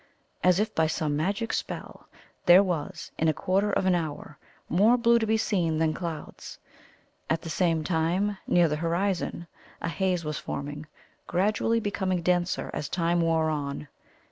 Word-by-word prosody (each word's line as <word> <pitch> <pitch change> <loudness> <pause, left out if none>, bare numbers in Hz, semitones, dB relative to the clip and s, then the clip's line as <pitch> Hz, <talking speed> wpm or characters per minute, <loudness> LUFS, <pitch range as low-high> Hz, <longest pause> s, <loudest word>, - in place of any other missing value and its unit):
As 180 0 +4
if 215 +1 0
by 160 -1 +2
some 155 -2 -1
magic 200 +9 -1
spell - - -5 0.4
there 180 +3 +8
was, 175 -6 -4
in 160 - +2
a 155 - +2
quarter 195 +5 +1
of 195 - 0
an 185 - +4
hour, 155 -3 -4 0.3
more 215 +8 +4
blue 235 0 +4
to 220 - -1
be 220 +1 +3
seen 175 -8 0
than 160 0 +1
clouds. 165 -4 -7 0.7
At 160 0 0
the 165 - -5
same 165 -1 +1
time, 180 +5 0
near 175 -1 +4
the 150 -1 -1
horizon, 170 +1 -1 0.3
a - - -3
haze 180 -1 -1
was 150 0 -3
forming, 145 +2 -5 0.4
gradually 210 +5 +1
becoming 190 -4 -1
denser 175 0 0
as 145 - -4
time 170 0 +1
wore 160 -1 +2
on. 145 -1 -4
175 Hz, 165 wpm, -27 LUFS, 160-195 Hz, 0.7 s, there